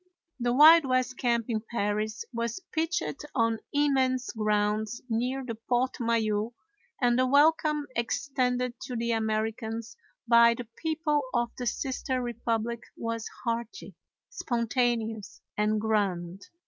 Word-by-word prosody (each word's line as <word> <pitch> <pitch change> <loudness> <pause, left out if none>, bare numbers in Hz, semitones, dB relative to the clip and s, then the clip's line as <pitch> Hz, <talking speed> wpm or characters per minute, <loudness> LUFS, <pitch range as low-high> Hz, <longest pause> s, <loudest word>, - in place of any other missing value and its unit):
The 240 0 +1
Wild 310 +4 +8
West 255 -1 +1
camp 235 -2 +1
in 220 -3 -1
Paris 215 0 -2
was 235 +2 -2
pitched 330 -2 -2
on 230 -2 +2
immense 265 -3 +1
grounds 215 0 0
near 250 +4 -1
the 235 - -4
Porte 245 +3 -1
Maillot, 225 -1 0 0.5
and 245 -1 +3
the 255 - +3
welcome 300 +1 +3
extended 250 +1 0
to 255 - -5
the 235 0 -1
Americans 225 +1 -2 0.3
by 235 0 +6
the 240 -1 -7
people 315 -2 0
of 240 0 +1
the 245 - -4
sister 260 +1 -2
republic 235 -1 -2 0.2
was 230 -1 -3 0.2
hearty, 230 -1 -4 0.4
spontaneous, 235 - -1 0.2
and 210 +1 +1
grand. 195 -4 -1
235 Hz, 120 wpm, -28 LUFS, 220-255 Hz, 0.5 s, Wild